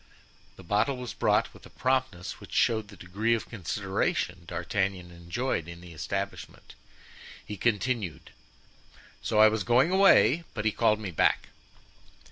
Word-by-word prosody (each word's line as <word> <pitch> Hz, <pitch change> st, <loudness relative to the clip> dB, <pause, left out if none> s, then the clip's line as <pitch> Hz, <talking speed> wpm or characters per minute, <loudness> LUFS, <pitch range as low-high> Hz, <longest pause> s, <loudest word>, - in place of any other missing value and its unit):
The 95 Hz, -, -13 dB
bottle 105 Hz, +9 st, +1 dB
was 125 Hz, -5 st, -6 dB
brought -, -, +1 dB
with -, -, -16 dB
a -, -, -18 dB
promptness 130 Hz, -9 st, -1 dB
which -, -, -12 dB
showed 110 Hz, -2 st, +2 dB
the 100 Hz, -, -13 dB
degree 105 Hz, +6 st, 0 dB
of 115 Hz, -, -5 dB
consideration 90 Hz, -3 st, -2 dB
D'Artagnan 90 Hz, +1 st, -2 dB
enjoyed 85 Hz, +2 st, -3 dB
in 85 Hz, 0 st, -9 dB
the 85 Hz, -1 st, -12 dB
establishment. 100 Hz, +5 st, -5 dB, 0.7 s
He 105 Hz, -, -6 dB
continued: 110 Hz, -3 st, -1 dB, 0.9 s
"So 110 Hz, -, -1 dB
I 110 Hz, 0 st, +8 dB
was 110 Hz, -2 st, 0 dB
going 125 Hz, -, +3 dB
away, 190 Hz, -3 st, +5 dB
but 105 Hz, -2 st, -3 dB
he 110 Hz, -, +3 dB
called 110 Hz, -1 st, +2 dB
me 105 Hz, -4 st, -5 dB
back. 80 Hz, -, +2 dB
105 Hz, 145 wpm, -28 LUFS, 90-120 Hz, 0.9 s, I